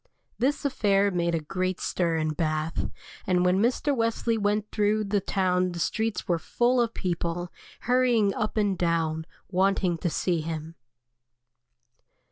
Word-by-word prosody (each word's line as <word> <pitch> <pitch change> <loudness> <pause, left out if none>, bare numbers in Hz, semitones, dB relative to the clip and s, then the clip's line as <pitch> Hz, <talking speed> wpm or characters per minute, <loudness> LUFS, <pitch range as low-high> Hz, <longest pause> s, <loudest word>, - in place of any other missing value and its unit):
This 280 +4 0
affair 200 -6 +2
made 170 -2 0
a - - 0
great 185 +4 -2
stir 170 -2 0
in 155 -1 0
Bath, 155 0 -1 0.4
and 180 -1 +2
when 180 +1 +3
Mr. 260 +5 +1
Wesley 230 0 0
went 210 0 0
through 210 0 +1
the 200 0 0
town 185 -1 +1
the 170 - -5
streets 220 +6 -1
were 170 -2 +1
full 245 +8 +2
of 230 -1 -1
people, 175 -1 -3 0.3
hurrying 245 -5 +3
up 215 0 -2
and 205 -2 +2
down, 165 -2 0 0.2
wanting 190 -2 +2
to 175 - 0
see 170 0 0
him. 160 0 -5
185 Hz, 145 wpm, -27 LUFS, 170-215 Hz, 0.4 s, when